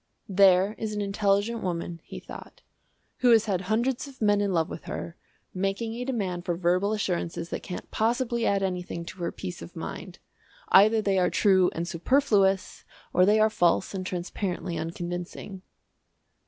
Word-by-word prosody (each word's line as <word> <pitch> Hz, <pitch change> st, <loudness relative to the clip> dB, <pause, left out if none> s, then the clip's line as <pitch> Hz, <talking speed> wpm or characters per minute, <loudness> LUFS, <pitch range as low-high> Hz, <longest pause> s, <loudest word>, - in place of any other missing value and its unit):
"There 195 Hz, +1 st, +5 dB
is 215 Hz, -1 st, -3 dB
an 210 Hz, -, -2 dB
intelligent 205 Hz, +3 st, +1 dB
woman," 170 Hz, -2 st, -4 dB
he -, -, -8 dB
thought, -, -, -12 dB, 0.5 s
"who 250 Hz, -, +3 dB
has 225 Hz, -2 st, +6 dB
had 190 Hz, -4 st, 0 dB
hundreds 235 Hz, +8 st, 0 dB
of 270 Hz, -2 st, -14 dB
men 205 Hz, -2 st, +3 dB
in 200 Hz, -1 st, 0 dB
love 165 Hz, -3 st, +1 dB
with 175 Hz, -, -8 dB
her, 170 Hz, -, -6 dB, 0.4 s
making 195 Hz, +4 st, -2 dB
a 240 Hz, +2 st, -4 dB
demand 195 Hz, -9 st, -2 dB
for 175 Hz, -1 st, -1 dB
verbal 180 Hz, +3 st, +1 dB
assurances 170 Hz, -4 st, -2 dB
that -, -, -4 dB
can't 180 Hz, -, -7 dB
possibly 235 Hz, +1 st, 0 dB
add 200 Hz, -1 st, +1 dB
anything 180 Hz, -2 st, -3 dB
to 185 Hz, -, -10 dB
her 170 Hz, -, -2 dB
peace 90 Hz, -, -7 dB
of 85 Hz, -, -10 dB
mind. -, -, -7 dB, 0.5 s
Either 215 Hz, +3 st, +6 dB
they 195 Hz, -2 st, +2 dB
are 180 Hz, -, +3 dB
true 190 Hz, -3 st, +4 dB
and 170 Hz, +1 st, -3 dB
superfluous, 195 Hz, -, +1 dB, 0.3 s
or 180 Hz, +1 st, +5 dB
they 215 Hz, +1 st, +5 dB
are 215 Hz, 0 st, +4 dB
false 175 Hz, 0 st, +2 dB
and 190 Hz, -1 st, -3 dB
transparently 180 Hz, 0 st, -3 dB
unconvincing." 175 Hz, +3 st, -5 dB
195 Hz, 165 wpm, -27 LUFS, 175-215 Hz, 0.5 s, has